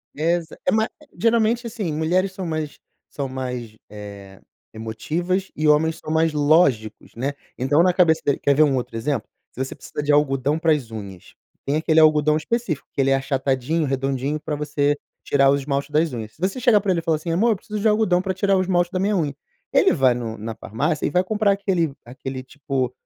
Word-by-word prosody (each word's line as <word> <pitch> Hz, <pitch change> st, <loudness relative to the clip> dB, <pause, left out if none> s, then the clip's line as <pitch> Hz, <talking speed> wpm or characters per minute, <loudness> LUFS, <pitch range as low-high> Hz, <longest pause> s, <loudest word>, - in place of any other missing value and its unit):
Exa 165 Hz, +2 st, -1 dB
E -, -, +5 dB
ma 220 Hz, 0 st, +2 dB, 0.3 s
geralmente 230 Hz, +1 st, +2 dB
assim, 215 Hz, -7 st, -3 dB
mulheres 175 Hz, +5 st, +1 dB
são 190 Hz, -1 st, -5 dB
mais 155 Hz, -3 st, -3 dB, 0.3 s
são 140 Hz, -2 st, -4 dB
mais, 125 Hz, -4 st, -5 dB
eh, 100 Hz, -2 st, -10 dB, 0.3 s
emotivas 165 Hz, -, -3 dB
e 155 Hz, +1 st, 0 dB
homens 160 Hz, +2 st, +3 dB
são 155 Hz, -, -7 dB
mais 160 Hz, 0 st, +2 dB
lógicos, 145 Hz, -8 st, +2 dB
né? 135 Hz, +5 st, -2 dB, 0.2 s
Então, 145 Hz, +6 st, +3 dB
na 180 Hz, 0 st, +3 dB
cabeça 165 Hz, -3 st, +3 dB
dele 140 Hz, -, +1 dB
quer 140 Hz, -, +2 dB
ver 155 Hz, -, +6 dB
outro 130 Hz, -5 st, 0 dB
exemplo? 125 Hz, -1 st, -2 dB, 0.2 s
Se 130 Hz, -, -3 dB
você 135 Hz, -, -7 dB
precisa -, -, -6 dB
de 145 Hz, 0 st, +1 dB
algodão 145 Hz, 0 st, +2 dB
para 165 Hz, 0 st, +2 dB
as 140 Hz, -7 st, 0 dB
unhas, 100 Hz, -5 st, -9 dB, 0.3 s
tem 140 Hz, -, -1 dB
aquele 160 Hz, 0 st, +3 dB
algodão 155 Hz, -1 st, +5 dB
específico 185 Hz, -, -2 dB
que -, -, -9 dB
ele 135 Hz, 0 st, +2 dB
é -, -, +5 dB
achatadinho, 135 Hz, +3 st, 0 dB
redondinho, 135 Hz, +2 st, -1 dB
para 150 Hz, 0 st, -4 dB
você 145 Hz, 0 st, 0 dB, 0.3 s
tirar 135 Hz, -1 st, +4 dB
o -, -, +4 dB
esmalte 140 Hz, +1 st, -2 dB
das 155 Hz, +1 st, +2 dB
unhas. 110 Hz, -3 st, -6 dB
Se -, -, -24 dB
você 190 Hz, +7 st, -1 dB
chegar 240 Hz, -5 st, +4 dB
para 200 Hz, -, -3 dB
ele 175 Hz, -, +1 dB
e -, -, -27 dB
falar 160 Hz, -1 st, +1 dB
assim: 160 Hz, +2 st, -4 dB
"Amor, 215 Hz, +8 st, +3 dB
eu -, -, +2 dB
preciso 210 Hz, +2 st, -6 dB
de 215 Hz, -, +2 dB
algodão 210 Hz, -4 st, +3 dB
para 190 Hz, 0 st, -2 dB
tirar 195 Hz, +1 st, +2 dB
o -, -, +2 dB
esmalte 175 Hz, -1 st, +1 dB
da 185 Hz, -, -2 dB
minha 205 Hz, +2 st, +1 dB
unha." 150 Hz, -6 st, -1 dB, 0.4 s
Ele -, -, +4 dB
vai 130 Hz, -2 st, +4 dB
num, 115 Hz, -2 st, -5 dB
na 110 Hz, +1 st, -6 dB
farmácia 145 Hz, +11 st, -2 dB
e -, -, +1 dB
vai 180 Hz, 0 st, +3 dB
comprar 210 Hz, +1 st, +1 dB
aquele 185 Hz, -6 st, 0 dB
aquele 130 Hz, +2 st, -7 dB
tipo, 135 Hz, -2 st, -3 dB
150 Hz, 210 wpm, -22 LUFS, 135-180 Hz, 0.4 s, ver